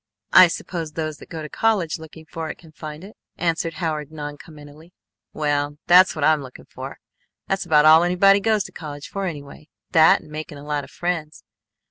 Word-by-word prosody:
"I 185 - +9
suppose 165 -2 -5
those 155 -1 -4
that - - -14
go 160 -1 -6
to - - -5
college 185 -3 0
looking 160 0 -12
for 160 0 -6
it - - -6
can 165 -3 -17
find 155 +1 -9
it," 205 +3 -12 0.2
answered 165 -1 -1
Howard 155 -4 -3
noncommittally. 150 +1 -10 0.4
"Well 145 -1 -1
that's 180 +2 +6
what 155 -2 0
I'm 155 -1 +3
looking 130 -2 -12
for. - - -9 0.5
That's 195 0 -2
about 150 -1 +5
all 160 +1 +8
anybody 180 +3 +4
goes 215 0 +1
to - - -10
college 145 -2 -8
for 195 -1 -4
anyway, 150 -2 -8 0.2
that 160 -1 +6
and 150 - -16
making 155 -1 -7
a 140 - -11
lot 150 -1 -2
of - - -12
friends. 165 -3 -4
155 Hz, 190 wpm, -22 LUFS, 150-175 Hz, 0.5 s, I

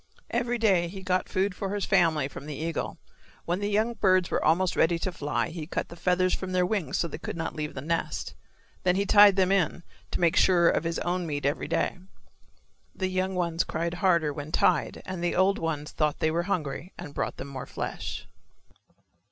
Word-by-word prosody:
Every 240 0 0
day 195 -7 +3
he 190 +2 -8
got 185 0 0
food 190 +1 0
for 195 +2 -3
his 205 - -1
family 165 -7 +3
from 140 +1 -10
the 150 - -5
eagle. 160 +2 -3 0.5
When 175 +2 -1
the 205 0 -1
young 215 +3 +1
birds 185 -5 +2
were - - 0
almost 175 +4 +2
ready 165 +1 +3
to 185 +2 -2
fly 150 -2 -2
he 165 -2 -6
cut - - -3
the 170 - -9
feathers 180 +1 +1
from 185 -1 -3
their 180 -1 +3
wings 195 -3 -1
so 170 - 0
they 155 - -7
could - - -5
not 165 -1 -3
leave 150 -1 -4
the 130 - -4
nest. 165 +2 -2 0.5
Then 180 -1 +2
he 200 +1 +1
tied 205 -1 +7
them 190 -1 +3
in 175 -3 +1 0.3
to - - -3
make 170 0 +3
sure 175 -2 +5
of - - 0
his 165 0 -1
own 175 0 -1
meat 145 -2 -3
every 145 +3 0
day. - - 0 1.0
The 185 -1 -1
young 185 0 -1
ones 170 -1 0
cried 170 +1 -2
harder 170 -5 +2
when 145 +2 -7
tied 165 -2 +1
and 185 -2 -5
the 175 - 0
old 190 +2 +3
ones 155 -2 -3
thought 150 -2 0
they 160 - +1
were 170 +4 -1
hungry 165 0 -3
and 145 - -8
brought - - -3
them 135 - -7
more 135 -2 -6
flesh. - - -5
175 Hz, 210 wpm, -27 LUFS, 160-190 Hz, 1.0 s, tied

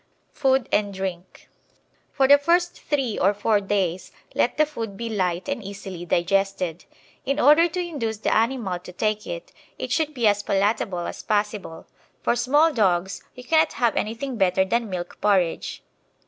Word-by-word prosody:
Food 265 -2 +1
and 205 -1 +1
Drink 190 -2 -6 0.6
For 270 -2 +2
the 285 +1 +7
first 345 +4 +1
three 270 -7 -1
or 200 +3 +3
four 205 0 +2
days 190 -3 -1 0.2
let - - +1
the 305 - +5
food 225 -9 -6
be 230 +1 -4
light 185 -4 -1
and 280 -5 -3
easily 195 -3 -7
digested. 180 -1 0 0.4
In 275 +2 -1
order 300 +5 +6
to 355 +2 -5
induce 280 -11 -3
the 215 - 0
animal 225 -5 0
to 180 - -11
take 215 +4 -2
it, - - -6 0.3
it - - -5
should 305 -2 0
be 240 -3 0
as 205 -1 +3
palatable 195 -3 0
as - - -6
possible. 210 -5 -2 0.4
For - - +2
small 290 +7 +3
dogs 190 -5 +1
you 250 - -10
cannot 315 +4 +3
have 235 -2 +1
anything 235 +4 -3
better 190 -1 +3
than 230 +2 -1
milk 180 -2 -6
porridge. 190 -5 0
215 Hz, 165 wpm, -24 LUFS, 190-270 Hz, 0.6 s, the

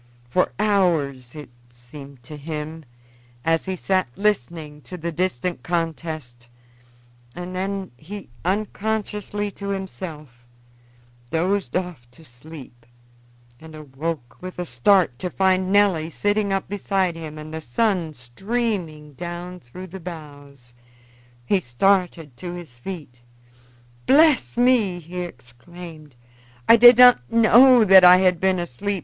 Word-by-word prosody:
For 180 +9 +1
hours, 160 - 0
as 150 - -7
it - - -17 0.2
seemed 125 +2 -13
to 150 +5 -9
him, 155 +1 -7 0.6
he 165 +3 0
sat 185 -1 0
listening 160 -6 -2
to 180 - -9
the 170 0 -4
distant 175 -2 -2
contest, 155 -7 -4 0.9
and 180 +1 -7
then 195 0 -3
he, 190 - -10
unconsciously 210 +1 -2
to 200 0 -8
himself, 155 -10 -7 0.8
dozed 180 +4 -1
off 175 -10 -6
to 160 - -17
sleep, 125 -2 -13 0.7
and 160 -1 -12
awoke 145 -3 -6
with 185 0 -8
a 180 - -3
start, 135 0 +2
to 180 - -3
find 185 0 +1
Nelly 195 -6 +3
sitting 205 +3 -1
up 195 0 -1
beside 195 -3 -1
him 155 -2 -8
and 155 +1 -9
the 160 - -5
sun 170 - -1
streaming 160 - -4
down 175 +3 -7
through 180 +6 -11
the 190 +1 -10
boughs. 145 -7 -11 0.7
He 195 +9 +2
started 170 0 0
to 175 -1 -7
his 160 -9 -11
feet. 145 -6 -8 0.9
"Bless 295 -3 +4
me!" 240 -7 +3
he 175 +2 -8
exclaimed, 155 +1 -11 0.5
"I 230 - +9
did 240 +1 +8
not 245 - +6
know 235 +1 +6
that 190 -1 +8
I 180 0 +9
had 185 -2 +2
been 190 0 +2
asleep. 180 +5 -3
175 Hz, 130 wpm, -22 LUFS, 150-195 Hz, 0.9 s, I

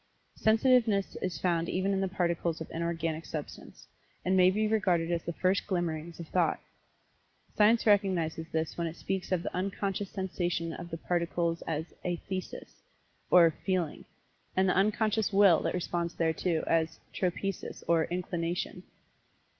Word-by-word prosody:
Sensitiveness 220 -3 +3
is 180 -4 -2
found 170 -2 0
even 190 +2 0
in 195 - 0
the 195 - +1
Particles 170 -3 -1
of 160 - -6
Inorganic 165 -1 -2
Substance, 155 -3 -8 0.4
and 185 +1 +2
may 185 -1 +6
be 215 +3 +1
regarded 180 -6 +1
as 170 -1 0
the 170 - -4
first 185 +3 +1
glimmerings 170 -3 -2
of 170 - -7
thought. 175 -3 +1 1.0
Science 220 +2 +4
recognizes 185 -6 +2
this 160 +1 -2
when 170 - 0
it 165 - -6
speaks 190 0 -3
of 180 -2 +1
the - - -4
unconscious 195 +1 -2
sensation 175 -3 -2
of 170 - -7
the 165 - -4
Particles 170 0 -1
as 160 0 -3
athesis 180 +1 -5 0.5
or 170 -2 +7
"feeling," 185 -5 -1 0.5
and 190 0 +4
the 180 - +2
unconscious 215 +2 +2
Will 195 -4 +6
that - - -1
responds 170 -1 -2
thereto, 165 0 0
as 165 0 +1
tropesis, 190 +1 -3
or 165 -1 +3
"inclination." 175 0 -3
175 Hz, 145 wpm, -30 LUFS, 165-195 Hz, 1.0 s, or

